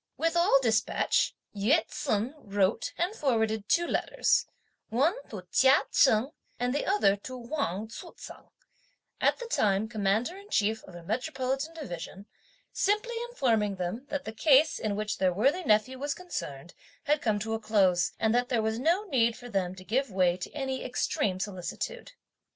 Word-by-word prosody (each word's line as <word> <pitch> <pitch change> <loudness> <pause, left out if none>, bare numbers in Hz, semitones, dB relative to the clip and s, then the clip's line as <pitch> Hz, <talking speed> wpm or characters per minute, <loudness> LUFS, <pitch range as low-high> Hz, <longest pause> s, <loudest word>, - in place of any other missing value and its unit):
With 330 +1 0
all 340 -5 +5
despatch, 220 -2 +1 0.2
Yü 220 +11 +4
ts'un 215 +6 -1
wrote 200 -3 0
and 355 +4 0
forwarded 220 - 0
two 345 - +3
letters, - - +1 0.4
one 275 +10 +2 0.2
to 200 -5 -7
Chia 265 +1 +5
Cheng, 250 +1 +4 0.3
and 245 +1 0
the 290 - -1
other 200 -1 +3
to 255 +5 -8
Wang 235 - -3
Tzu 340 +10 -9
t'eng, - - -12 0.7
at - - +3
that 480 -1 -8
time 205 0 +2
commander 215 - 0
in 400 +1 -13
chief 220 - +1
of 180 - -13
a 175 - -10
Metropolitan 265 - -2
Division, 195 - -7 0.5
simply 425 +4 0 0.2
informing 225 - +1
them: 190 +9 -4
that 285 -1 -3
the 220 - -5
case, 290 +5 +4
in 210 -2 -1
which 215 0 -3
their 185 -1 +3
worthy 275 - +2
nephew 250 +1 +2
was 285 +1 -2
concerned, 170 - -6 0.3
had 295 0 +1
come 215 -3 +1
to 220 +2 -3
a 225 - -1
close, 195 -5 +2
and 220 0 +2
that 245 +1 +1
there 235 -4 +1
was 220 +1 -1
no 335 +9 +2
need 235 - +1
for 245 0 -10
them 190 -4 -1
to 185 - -11
give 260 +7 0
way 185 -3 +2
to 180 - -7
any 265 -3 -3
extreme 205 -6 -1
solicitude. 200 - -5
230 Hz, 170 wpm, -29 LUFS, 205-285 Hz, 0.7 s, all